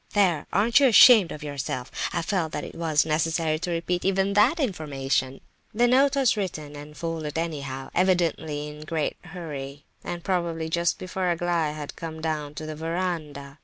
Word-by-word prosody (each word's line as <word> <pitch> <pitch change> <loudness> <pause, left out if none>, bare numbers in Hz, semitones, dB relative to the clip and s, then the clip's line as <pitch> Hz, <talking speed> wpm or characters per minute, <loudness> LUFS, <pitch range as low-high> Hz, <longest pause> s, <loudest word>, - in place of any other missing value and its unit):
There! 185 -6 +2
aren't 225 +7 +4
you 275 - +6
ashamed 225 -5 +8
of 150 - -7
yourself? 135 -3 -4 0.2
I 170 - -1
felt 170 -3 -1
that 150 - -3
it - - -8
was 160 -3 +1
necessary 160 0 0
to 180 +2 -4
repeat 175 +1 -1
even 195 +1 +1
that 235 +11 +4
information." 135 - -1 0.3
The 240 +2 +4
note 270 +3 +4
was 270 -5 +3
written 155 -8 -4
and 150 +1 -10
folded 160 -3 -4
anyhow, 140 -5 -4
evidently 165 -5 +1
in 150 0 -9
a - - -9
great 155 -1 -2
hurry, 145 -5 -7 0.2
and 175 -1 -5
probably 170 -3 -1
just 170 +1 +1
before 185 0 -2
Aglaya 170 -3 0
had 150 -1 -7
come 160 -1 -7
down 155 -2 -3
to 155 - -6
the 155 0 -5
verandah. 155 -4 -4
165 Hz, 175 wpm, -25 LUFS, 150-180 Hz, 0.3 s, ashamed